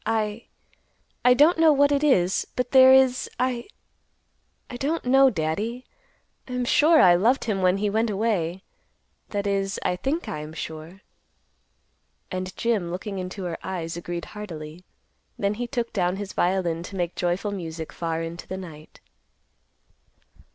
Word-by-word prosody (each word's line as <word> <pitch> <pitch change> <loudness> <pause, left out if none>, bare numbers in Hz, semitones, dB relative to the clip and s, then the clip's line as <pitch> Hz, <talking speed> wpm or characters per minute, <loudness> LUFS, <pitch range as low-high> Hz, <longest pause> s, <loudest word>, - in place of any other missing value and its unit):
I—I 225 +3 -2
don't 315 +5 +5
know 325 -1 +6
what 285 0 +4
it 285 +1 +1
is, 190 -11 +2
but 250 -1 -2
there 260 -1 +8
is—I—I 255 -1 +2 1.1
don't 300 +5 -2
know, 270 +2 +6
Daddy. 210 +7 -3 0.6
I 250 - -7
am 250 0 -1
sure 310 +6 +5
I 180 -8 +7
loved 225 +10 +2
him 205 -4 -1
when 185 +1 +3
he 210 +1 0
want 220 +3 +1
away, 195 -4 -1 0.7
that 205 -1 -3
is, 195 -1 -1
I 180 - +1
think 275 - -2
I 155 - -4
am 150 +1 -8
sure." 160 +4 -8 1.3
And 185 0 -5
Jim, 220 -7 0
looking 190 +3 -5
into 185 +1 -6
her 175 -2 -4
eyes, 170 -3 -4
agreed 170 0 -5
heartily; 170 -5 -9 0.5
then 200 0 0
he 240 +3 -4
took 240 -2 -3
down 180 -2 0
his 200 0 -6
violin 175 -2 0
to 190 +3 -9
make 175 -2 -2
joyful 180 +4 -1
music 165 -4 -6
far 165 -1 -3
into 165 +1 -7
the 190 - -5
night. 160 -5 -11
195 Hz, 150 wpm, -25 LUFS, 175-245 Hz, 1.3 s, there